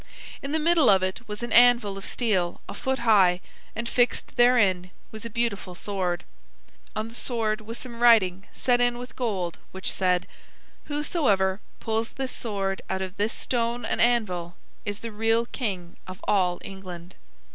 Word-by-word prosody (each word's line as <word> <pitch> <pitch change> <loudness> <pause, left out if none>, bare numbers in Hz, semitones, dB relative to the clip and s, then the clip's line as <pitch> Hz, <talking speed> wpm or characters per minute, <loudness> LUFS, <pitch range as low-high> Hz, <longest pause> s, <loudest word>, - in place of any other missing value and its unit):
In 275 - -4
the 315 - +2
middle 320 -2 +4
of 190 -1 +5
it 190 +5 -3
was 210 +2 -6
an 240 - -3
anvil 240 -4 +6
of 195 - -7
steel 190 -8 0
a - - -6
foot 265 0 -1
high, 190 -5 +5 0.4
and 235 +1 -3
fixed 245 +1 +1
therein 205 -8 +4 0.2
was 220 +1 -7
a - - -4
beautiful 215 -5 -2
sword. 185 -3 -2 0.7
On 215 +1 -2
the - - -12
sword 225 -3 -1
was 225 +2 -6
some 235 -2 -8
writing 200 -6 +5
set 245 -1 +1
in 245 0 +2
with 245 -1 -9
gold 195 -9 -2
which 190 0 -2
said: 180 -1 +1 0.6
"Whosoever 265 - +1 0.2
pulls 225 +1 -2
this 265 -1 -3
sword 195 -4 -3
out 190 0 -1
of 185 +1 -7
this 210 +2 0
stone 235 0 -1
and - - 0
anvil 185 -8 +1 0.3
is 205 0 -4
the 230 - -5
real 225 +2 +2
king 190 -9 -4
of 185 0 -8
all 180 -3 +2
England." 185 -2 -9
215 Hz, 170 wpm, -26 LUFS, 190-240 Hz, 0.7 s, anvil